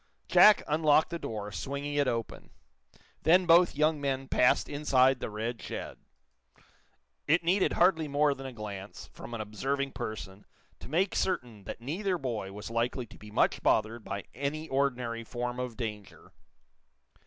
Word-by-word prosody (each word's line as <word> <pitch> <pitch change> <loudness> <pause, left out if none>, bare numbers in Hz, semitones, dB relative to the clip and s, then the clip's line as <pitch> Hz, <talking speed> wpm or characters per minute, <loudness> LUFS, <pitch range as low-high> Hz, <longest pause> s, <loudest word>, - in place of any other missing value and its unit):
Jack 210 -1 +7
unlocked 155 +1 +3
the 170 - -3
door, 105 -6 -5
swinging 140 +9 -4
it 145 -1 +2
open. 115 -2 -3 0.7
Then 180 +3 +5
both 175 0 +5
young 150 0 +2
men 135 -1 -2
passed 130 +2 +3
inside 135 -3 +3
the - - -4
red 110 +2 -4
shed. - - -6 1.3
It 165 +4 +3
needed 185 +3 +2
hardly 170 -3 +3
more 145 0 +2
than 135 -1 -8
a - - -6
glance, 105 -3 -8
from 120 - -8
an 110 - -4
observing 135 +7 -2
person, 100 -4 -7 0.3
to - - -10
make 180 +6 +1
certain 120 - -2
that - - -7
neither 180 - -2
boy 115 - -4
was 105 +2 -8
likely 120 +2 -1
to - - -16
be 105 - -11
much 105 - +1
bothered 110 +1 +1
by 100 0 -5
any 145 +5 -3
ordinary 125 -4 -1
form 120 +2 -4
of 125 -3 -4
danger. 105 -4 -7
130 Hz, 155 wpm, -30 LUFS, 110-150 Hz, 1.3 s, Jack